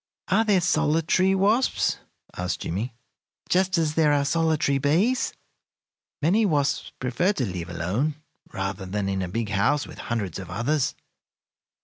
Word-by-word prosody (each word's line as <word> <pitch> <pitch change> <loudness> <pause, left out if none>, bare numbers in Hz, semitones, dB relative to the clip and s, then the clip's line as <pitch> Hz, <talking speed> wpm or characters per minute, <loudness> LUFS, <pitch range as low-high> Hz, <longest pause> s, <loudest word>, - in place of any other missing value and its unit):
"Are 225 - +4
there 205 -4 +3
solitary 165 +3 +2
wasps," 210 +7 +2 0.4
asked 90 +1 -3
Jimmie, 115 +7 -3 0.5
"just 185 0 +2
as 160 -2 +1
there 155 -2 +3
are 140 -1 +2
solitary 155 -2 +1
bees?" 175 - +2 0.9
"Many 195 +9 +4
wasps 145 -8 0
prefer 155 +11 +1
to 135 -10 -1
live 90 -3 -5
alone 95 - -1 0.4
rather 95 0 -4
than 100 +1 -2
in 95 -1 -1
a 90 - -2
big 115 +2 -2
house 130 +8 +1
with - - -11
hundreds 105 -8 -3
of 95 -2 -8
others. 120 - 0
145 Hz, 140 wpm, -25 LUFS, -, 0.9 s, Are